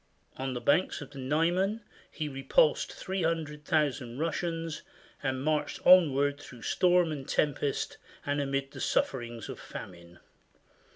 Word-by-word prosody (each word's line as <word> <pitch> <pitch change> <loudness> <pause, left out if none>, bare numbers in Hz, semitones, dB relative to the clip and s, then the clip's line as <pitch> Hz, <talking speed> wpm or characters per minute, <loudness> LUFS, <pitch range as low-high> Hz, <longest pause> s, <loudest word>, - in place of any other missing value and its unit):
On 130 -1 -3
the - - -2
banks 180 +6 +2
of 145 - -9
the 140 - -9
Niemen 175 - +1 0.3
he 155 - -4
repulsed 145 - +2
300,000 150 -7 -1
Russians 165 0 -2 0.4
and 130 -1 -1
marched 155 0 0
on 180 -5 +8
ward 140 +1 +1
through 120 -5 -12
storm 180 -2 +3
and 140 -3 -5
tempest 145 -1 0 0.3
and 145 0 0
amid 135 0 -2
the - - -8
sufferings 120 -3 -1
of - - -7
famine. 85 -1 -10
145 Hz, 130 wpm, -30 LUFS, 135-165 Hz, 0.4 s, on